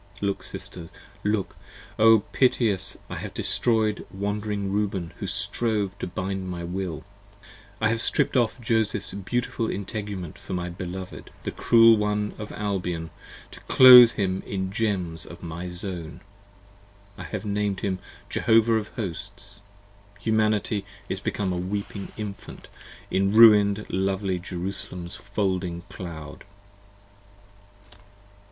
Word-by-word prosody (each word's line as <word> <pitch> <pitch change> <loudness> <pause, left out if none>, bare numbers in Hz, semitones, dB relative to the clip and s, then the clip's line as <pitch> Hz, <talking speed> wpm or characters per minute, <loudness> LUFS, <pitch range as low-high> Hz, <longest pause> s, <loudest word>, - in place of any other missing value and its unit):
look 100 -1 -1
Sisters, 85 -2 -8 0.3
look! 105 -1 -1 0.4
O 110 -1 +7
piteous! 110 -7 +2
10 - - -6
I - - -5
have - - -7
destroy'd 110 -3 +1
Wand'ring 100 0 -3
Reuben 95 -5 -1
who 100 - -3
strove 100 +1 -1
to - - -3
bind 95 +1 -4
my 85 -1 -5
Will, 90 -2 -4 0.8
I 110 - +2
have 115 0 0
strip'd - - +1
off 120 0 +2
Joseph's 110 -4 0
beautiful 115 +3 -2
integument 100 -4 -5
for - - -7
my 90 -1 -3
Beloved, 90 +1 -7
The - - -3
Cruel 115 -1 +6
one 105 0 -1
of 105 - -6
Albion, 90 -6 -3 0.4
to - - -11
clothe 125 -2 +10
him 95 -2 -1
in 95 -1 -3
gems 95 -7 -2
of 85 - -11
my 85 +2 -5
Zone. 90 -2 -6 0.9
I - - -8
have 105 0 -5
named 105 -1 -1
him 95 -2 -1 0.3
Jehovah 115 0 +3
of 110 -1 -3
Hosts. 100 -1 -6 0.6
Humanity 110 -2 +1 0.3
is - - -2
become 95 -3 -2
A - - -2
weeping 100 +2 -4
Infant 105 -2 -8 0.4
in 95 +1 +2
ruin'd 105 -2 +7
lovely 95 0 -1
Jerusalem's 90 -1 -5
folding 95 -4 -2
Cloud! 80 -4 -8
100 Hz, 125 wpm, -25 LUFS, 90-105 Hz, 0.9 s, clothe